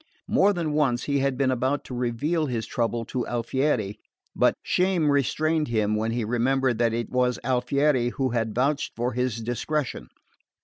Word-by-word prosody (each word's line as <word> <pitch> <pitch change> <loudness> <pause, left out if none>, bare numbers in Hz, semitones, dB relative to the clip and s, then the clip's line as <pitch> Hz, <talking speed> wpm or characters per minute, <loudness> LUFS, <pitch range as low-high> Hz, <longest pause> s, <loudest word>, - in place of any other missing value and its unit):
More 200 +2 +4
than 170 -6 -2
once 135 -5 +1
he 140 -1 0
had 135 -1 0
been 135 -1 +2
about 130 +3 0
to - - -9
reveal 135 +7 -1
his 115 -4 -2
trouble 115 -1 -1
to 125 +1 -3
Alfieri; 120 -3 -1 0.4
but - - +3
shame 180 -5 +2
restrained 155 +3 +1
him 110 -2 +1
when 110 +1 -1
he 115 -1 -1
remembered 125 +1 +1
that 115 -1 +3
it 115 +1 -3
was 125 -1 +1
Alfieri 130 0 +1
who 130 +1 -1
had 115 -2 -1
vouched 140 +4 0
for 120 +2 -1
his 125 -2 -1
discretion. 130 +4 -2
125 Hz, 170 wpm, -25 LUFS, 120-145 Hz, 0.4 s, More